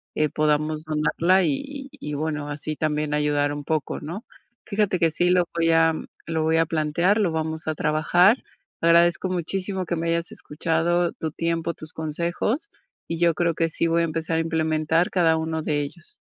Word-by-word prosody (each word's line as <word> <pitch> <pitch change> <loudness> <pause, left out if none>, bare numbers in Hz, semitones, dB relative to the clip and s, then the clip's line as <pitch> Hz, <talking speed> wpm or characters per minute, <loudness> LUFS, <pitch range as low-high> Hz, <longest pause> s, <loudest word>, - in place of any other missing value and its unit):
eh, 155 - +2
podamos 155 +1 0
donarla 160 +4 +2
y 145 -4 0
y 280 -1 -8
y 150 - -7
bueno, 150 -1 -3
así 150 +1 -4
también 150 -1 -1
ayudar 145 -1 +1
un 145 0 -5
poco, 155 0 -2
¿no?, 170 +9 -6 0.4
fíjate 205 -3 +1
que 165 -1 +3
sí 175 +3 +1
lo 180 -1 +4
voy 165 -1 +2
a 165 0 +4 0.3
lo 160 -1 -1
voy 160 +1 +2
a 165 - +4
plantear, 165 +7 +1
lo 195 -6 +2
vamos 160 0 -3
a 155 - 0
trabajar. 175 - +3 0.4
Agradezco 170 +2 +4
muchísimo 185 +2 -2
que 170 - -2
me 165 0 -2
hayas 170 +1 0
escuchado, 165 +3 0
tu 160 - -4
tiempo, 165 +1 -2
tus 155 0 -11
consejos, 170 - -2 0.4
y 165 - -3
yo 170 -2 +3
creo 170 0 +1
que 165 0 0
sí 160 - 0
voy 165 0 +2
a - - +2
empezar 160 0 -2
a - - +2
implementar 160 +1 +1
cada 165 -3 +3
1 160 0 -2
de 150 -1 0
ellos. 420 - -9
165 Hz, 185 wpm, -24 LUFS, 155-175 Hz, 0.4 s, lo